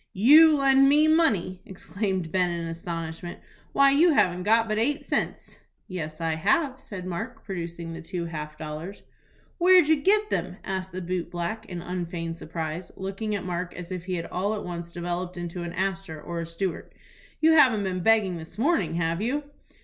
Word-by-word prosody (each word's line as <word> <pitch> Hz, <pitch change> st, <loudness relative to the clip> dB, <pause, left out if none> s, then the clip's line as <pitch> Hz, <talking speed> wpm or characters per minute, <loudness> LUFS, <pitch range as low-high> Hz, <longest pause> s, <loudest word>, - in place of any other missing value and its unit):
"You 300 Hz, +10 st, +7 dB
lend 275 Hz, 0 st, +5 dB
me 300 Hz, +2 st, +5 dB
money!" 205 Hz, -, +2 dB
exclaimed 190 Hz, -3 st, -3 dB
Ben, 180 Hz, -1 st, +2 dB
in 170 Hz, -1 st, -3 dB
astonishment. 165 Hz, 0 st, -5 dB, 0.3 s
"Why, 275 Hz, 0 st, +5 dB
you 320 Hz, +4 st, +5 dB
haven't 180 Hz, -8 st, +2 dB
got 225 Hz, +4 st, +3 dB
but 215 Hz, 0 st, 0 dB
eight 285 Hz, +6 st, +1 dB
cents." -, -, -3 dB, 0.3 s
"Yes, 155 Hz, -4 st, -5 dB
I 165 Hz, -1 st, 0 dB
have," 265 Hz, -, +1 dB
said 185 Hz, -7 st, -8 dB
Mark, 220 Hz, +8 st, -5 dB
producing 170 Hz, -3 st, -5 dB
the 170 Hz, -, -7 dB
two 175 Hz, +1 st, -4 dB
half 155 Hz, -2 st, -6 dB
dollars. 155 Hz, +5 st, -7 dB, 0.6 s
"Where'd 360 Hz, -2 st, +6 dB
you 315 Hz, 0 st, +4 dB
get 420 Hz, +5 st, +3 dB
them?" -, -, -2 dB
asked 190 Hz, -1 st, -4 dB
the 185 Hz, 0 st, -5 dB
boot 175 Hz, -1 st, -3 dB
black, 175 Hz, +6 st, -4 dB
in 175 Hz, -3 st, -6 dB
unfeigned 170 Hz, -2 st, -4 dB
surprise, 160 Hz, +2 st, -5 dB
looking 195 Hz, +3 st, -3 dB
at 195 Hz, -, -4 dB
Mark 180 Hz, 0 st, -4 dB
as 180 Hz, 0 st, -8 dB
if 180 Hz, -1 st, -5 dB
he 185 Hz, -1 st, -2 dB
had 165 Hz, -, -3 dB
all 200 Hz, +4 st, -1 dB
at 210 Hz, -, -5 dB
once 170 Hz, -1 st, -6 dB
developed 175 Hz, +1 st, -4 dB
into 175 Hz, 0 st, -5 dB
an 170 Hz, 0 st, -5 dB
Astor 190 Hz, -3 st, -3 dB
or 170 Hz, +2 st, -5 dB
a 165 Hz, -, -4 dB
Stewart. 170 Hz, +2 st, -4 dB, 0.5 s
"You 320 Hz, +1 st, +5 dB
haven't 255 Hz, -10 st, +5 dB
been 185 Hz, -1 st, -2 dB
begging 205 Hz, -3 st, +3 dB
this 160 Hz, +4 st, -11 dB
morning, 290 Hz, -, +1 dB
have 170 Hz, +1 st, -1 dB
you?" 270 Hz, +7 st, -1 dB
185 Hz, 185 wpm, -26 LUFS, 170-225 Hz, 0.6 s, You